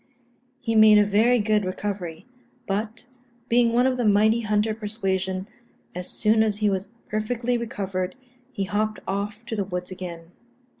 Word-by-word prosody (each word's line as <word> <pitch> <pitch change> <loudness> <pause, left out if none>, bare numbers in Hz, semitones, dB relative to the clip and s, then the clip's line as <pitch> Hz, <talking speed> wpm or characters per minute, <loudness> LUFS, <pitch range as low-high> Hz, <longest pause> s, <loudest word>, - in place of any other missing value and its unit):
He 230 -3 -2
made 215 -1 +7
a 210 - +5
very 220 +5 +4
good 215 -1 +2
recovery; 185 -2 -4 0.4
but, 215 +3 -3 0.4
being 235 0 +4
one 245 +2 +3
of 260 -1 +1
the 245 - 0
mighty 215 +2 +4
hunter 215 0 +1
persuasion, 190 -3 -2 0.5
as 180 0 -5
soon 220 0 +2
as 215 -2 +1
he 210 -1 +2
was 195 +1 -2 0.2
perfectly 235 +3 -1
recovered, 195 -6 -3 0.4
he 200 - -2
hopped 215 +2 -1
off 205 +3 -3
to 225 - -4
the 205 - 0
woods 180 -1 -5
again. 175 -2 -8
210 Hz, 155 wpm, -24 LUFS, 190-225 Hz, 0.5 s, made